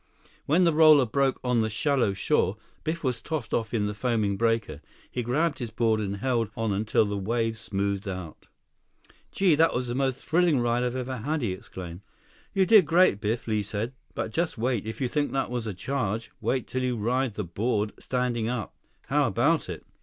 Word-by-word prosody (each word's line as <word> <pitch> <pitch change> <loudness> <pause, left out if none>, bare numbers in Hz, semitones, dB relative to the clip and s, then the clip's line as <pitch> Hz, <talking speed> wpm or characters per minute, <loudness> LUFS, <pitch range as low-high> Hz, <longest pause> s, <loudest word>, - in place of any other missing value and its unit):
When 165 +6 +4
the 170 -2 +4
roller 155 -3 +7
broke 135 +3 +1
on 125 -2 +2
the 110 - 0
shallow 120 -1 +1
shore, 100 -1 +1 0.3
Biff 165 +2 -3
was 125 -3 -1
tossed 150 -8 -4
off 115 -1 0
in 110 -3 0
the 105 - -2
foaming 110 -3 0
breaker. 115 -8 0 0.3
He 125 - -2
grabbed 145 +7 0
his 120 -3 -4
board 110 0 +1
and 100 -1 -2
held 115 -1 0
on 110 -2 0
until 105 +2 +2
the 100 0 -2
wave 115 +3 -1
smoothed 100 -2 -2
out. 90 -4 -7 0.8
"Gee! 190 -4 +3
That's 150 -5 +3
the 120 - -3
most 130 0 -1
thrilling 170 -4 +3
ride 120 0 +1
I've 125 0 -1
ever 130 0 -3
had!" 145 +5 -2
he 105 - 0
exclaimed. 90 -1 -8 0.5
"You 195 -1 +3
did 195 -4 +6
great, 165 - +4
Biff," 110 +3 -1
Li 110 -1 +1
said. 105 +4 -3 0.2
"But 110 - -3
just 165 +3 -1
wait. 115 -2 -1
If 110 - -6
you 130 - +2
think 145 +2 -1
that 135 -3 -1
was 120 -2 -2
a 105 - -3
charge, 115 0 -2
wait 130 -2 0
till 130 +2 -3
you 125 -1 -1
ride 120 +2 0
the 105 - -2
board 105 +4 -1
standing 125 -3 -1
up. 120 -6 -3 0.3
How 145 -1 +2
about 120 - +1
it?" 85 -3 -7
120 Hz, 200 wpm, -27 LUFS, 105-135 Hz, 0.8 s, roller